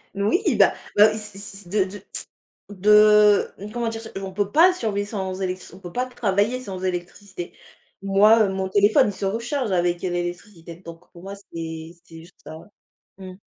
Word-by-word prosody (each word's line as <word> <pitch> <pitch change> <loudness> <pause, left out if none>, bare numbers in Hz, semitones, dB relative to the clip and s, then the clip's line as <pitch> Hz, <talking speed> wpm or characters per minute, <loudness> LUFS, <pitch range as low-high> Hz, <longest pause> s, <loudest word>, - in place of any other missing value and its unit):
Oui, 210 - +1
bah - - +5 0.2
bah, 210 +1 +6
si 210 -2 -7
si 200 -1 -6
si 185 -4 -12
de 200 -1 +1
de 195 +1 -10 1.5
de 205 +2 -9
comment 240 -1 -2
dire 225 0 -4
ça? 225 - -10
On 195 -1 -6
peut 205 +1 -2
pas 360 +4 +6
survivre 205 - -3
sans 190 -3 -4
électric 185 -2 -5
on 185 - -14
peut 175 -2 -10
pas 250 +1 -1
travailler 225 0 -1
sans 190 -6 -7
électricité. 180 0 -5 0.5
Moi, 210 +3 +5
heu, 195 - +1
mon 190 0 -3
téléphone, 210 +7 +4
il 205 - -3
se 195 - -8
recharge 230 +3 -2
avec, 175 -1 0
heu, 185 - -1
l'électricité, 175 0 -6
donc, 170 -1 -13
pour 175 +1 -14
moi, 200 +1 -7
c'est 165 -4 -8
c'est 165 -1 -13
juste 170 +2 -16
ça. 155 - -9 0.6
Mmh. 185 -1 -9
195 Hz, 185 wpm, -23 LUFS, 180-210 Hz, 1.5 s, bah